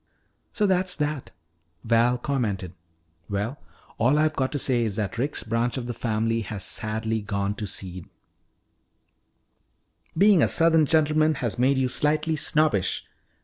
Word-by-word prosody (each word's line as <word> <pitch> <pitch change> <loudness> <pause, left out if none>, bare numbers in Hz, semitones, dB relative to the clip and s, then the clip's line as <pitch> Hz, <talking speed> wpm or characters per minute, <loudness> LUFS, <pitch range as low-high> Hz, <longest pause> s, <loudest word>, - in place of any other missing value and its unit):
"So 210 - 0
that's 185 -1 +2
that," 150 -2 -3 0.5
Val 115 +2 +3
commented. 105 - -2 0.6
"Well, 105 +7 -3 0.4
all 130 +6 +3
I've 155 0 +2
got 130 -1 -1
to - - 0
say 125 -3 +1
is 110 -4 -1
that 105 +1 -3
Rick's 140 +4 -2
branch 115 +3 -1
of 125 - -4
the 120 - -4
family 115 0 -1
has 105 -3 -5
sadly 110 +2 -2
gone 100 -1 -2
to 105 - -4
seed 90 -2 -5 0.6
" 80 - -30
"Being 200 -1 +6
a - - +4
southern 165 -2 +3
gentleman 155 0 +3
has 120 -3 -3
made 135 +2 +3
you 130 -1 +2
slightly 155 +4 0
snobbish." 150 - +1
120 Hz, 145 wpm, -25 LUFS, 110-150 Hz, 0.6 s, Being